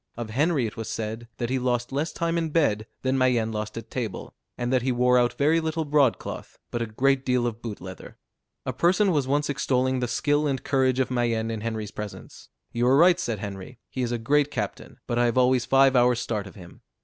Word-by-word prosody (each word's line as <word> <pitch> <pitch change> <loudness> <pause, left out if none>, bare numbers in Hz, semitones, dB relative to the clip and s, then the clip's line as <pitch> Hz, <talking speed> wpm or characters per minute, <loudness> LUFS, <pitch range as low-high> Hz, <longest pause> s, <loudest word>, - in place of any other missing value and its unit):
Of 115 -2 -5
Henry 145 +2 +1
it 110 - -6
was 115 - -5
said, 110 +1 -4
that 120 0 -3
he 130 - +1
lost 120 0 -1
less 145 +4 -1
time 170 0 -1
in 165 -1 0
bed 115 -9 +1 0.2
than 130 0 +1
Mayenne 120 -3 +2
lost 105 0 -4
at 115 - -8
table; 115 -6 -4 0.2
and 120 +1 -1
that 130 - +3
he 130 +2 0
wore 125 0 +3
out 120 0 +2
very 155 +4 +3
little 160 0 -2
broad 145 -4 +3
cloth, - - -8
but 120 - -2
a 115 - -1
great 135 +5 +1
deal 125 -2 +1
of 115 -1 -3
boot 110 -4 -6
leather. 95 0 -10 0.5
A - - -2
person 190 +3 +3
was 145 -5 +1
once 145 +2 +1
extolling 130 -2 0
the 125 - -1
skill 145 +5 +1
and 135 -2 -2
courage 130 -2 +2
of 130 - 0
Mayenne 115 -2 0
in 110 -1 -4
Henry's 110 -2 -4
presence. 105 -1 -9 0.2
"You 120 +1 +1
are 135 +2 +5
right," 175 +3 +6
said 115 -10 -2
Henry, 100 +4 -7
"he 130 - -3
is 120 -1 -1
a 120 - 0
great 145 +5 +2
captain, - - -5
but 120 0 -1
I 120 - +4
have 120 +1 0
always 125 -1 +3
five 135 0 +4
hours' 125 -1 +4
start 105 -4 -3
of 100 - -13
him." 90 -4 -13
125 Hz, 230 wpm, -25 LUFS, 115-140 Hz, 0.5 s, right